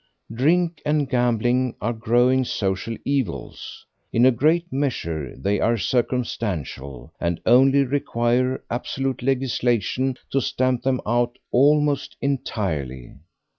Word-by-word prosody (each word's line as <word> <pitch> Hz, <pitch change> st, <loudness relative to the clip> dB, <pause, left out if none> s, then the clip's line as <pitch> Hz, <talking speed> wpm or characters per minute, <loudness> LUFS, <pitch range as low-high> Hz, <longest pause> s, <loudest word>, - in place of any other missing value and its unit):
Drink 165 Hz, +7 st, +1 dB
and 150 Hz, -1 st, +1 dB
gambling 125 Hz, 0 st, +1 dB
are 120 Hz, +3 st, -1 dB
growing 120 Hz, +3 st, +2 dB
social 100 Hz, 0 st, -2 dB
evils; 135 Hz, -10 st, -3 dB, 0.3 s
in 120 Hz, +2 st, +4 dB
a 130 Hz, -, +7 dB
great 160 Hz, +7 st, +1 dB
measure 85 Hz, -, -2 dB
they 100 Hz, +8 st, 0 dB
are 115 Hz, +1 st, +2 dB
circumstantial, 95 Hz, -, -3 dB
and 85 Hz, -1 st, -1 dB
only 135 Hz, +4 st, +5 dB
require 125 Hz, -1 st, 0 dB
absolute 135 Hz, +2 st, -2 dB
legislation 125 Hz, -1 st, 0 dB
to 135 Hz, -, +2 dB
stamp 130 Hz, -1 st, 0 dB
them 130 Hz, -1 st, 0 dB
out 120 Hz, +2 st, 0 dB
almost 145 Hz, +2 st, +2 dB
entirely. 80 Hz, -, -3 dB
125 Hz, 110 wpm, -23 LUFS, 110-135 Hz, 0.3 s, a